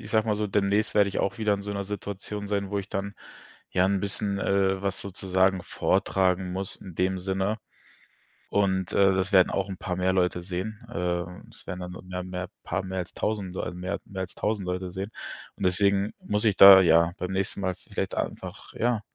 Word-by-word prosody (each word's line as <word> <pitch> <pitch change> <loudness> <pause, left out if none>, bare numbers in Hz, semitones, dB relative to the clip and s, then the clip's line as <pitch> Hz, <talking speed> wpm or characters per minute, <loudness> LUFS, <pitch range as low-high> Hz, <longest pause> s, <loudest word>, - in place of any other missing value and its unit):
ich - - -9
sage 110 0 +2
mal 105 - +2
so, 105 0 -1
demnächst 100 +2 +1
werde 100 -1 +5
ich - - -3
auch 120 +4 -1
wieder 105 -2 +2
in 100 - -5
so 100 - -5
'ner 100 -1 -3
Situation 100 +1 -5
sein, 100 -1 -1
wo 100 - 0
ich 95 - -6
dann, 100 +1 -3 0.6
ja, 90 0 +3
'n 100 0 +1
bisschen 100 0 -2
äh, 95 -1 +1
was 100 -1 -2
sozusagen 95 -1 +1
vortragen 90 0 +1
muss 95 0 -4
in 90 -4 -11
dem 95 0 +1
Sinne. 95 +3 -1 0.9
Und, 95 -3 +1
äh, 95 -1 +5
das 95 +1 0
werden 95 -2 +6
auch 95 0 -1
'n 95 - -5
paar 90 -1 -3
mehr 95 +1 +1
Leute 90 -1 +1
sehen. 95 +5 -5
Ähm, 90 -2 -3
es - - -16
werden 90 -1 -5
dann 90 0 -6 0.2
mehr 90 0 -4
mehr 90 0 -5 0.2
paar 95 +3 -1
mehr 95 0 -5
als 90 - -5
1.000, 100 -4 -2
so - - -3
mehr 90 +3 -4
mehr 95 -1 -6
als 95 -1 -5
1.000 105 -3 -1
Leute 90 0 -3
sehen. 100 +3 -5 0.4
Und - - -7
deswegen 100 +2 +2
muss 105 +2 0
ich 100 -3 +4
da, 95 -1 +11
ja, 85 0 +5
beim 90 +1 -3
nächsten 95 +1 -1
Mal 95 -1 -1
vielleicht - - -4
einfach, - - -5
ja, 120 -2 0
95 Hz, 210 wpm, -27 LUFS, 90-100 Hz, 0.9 s, da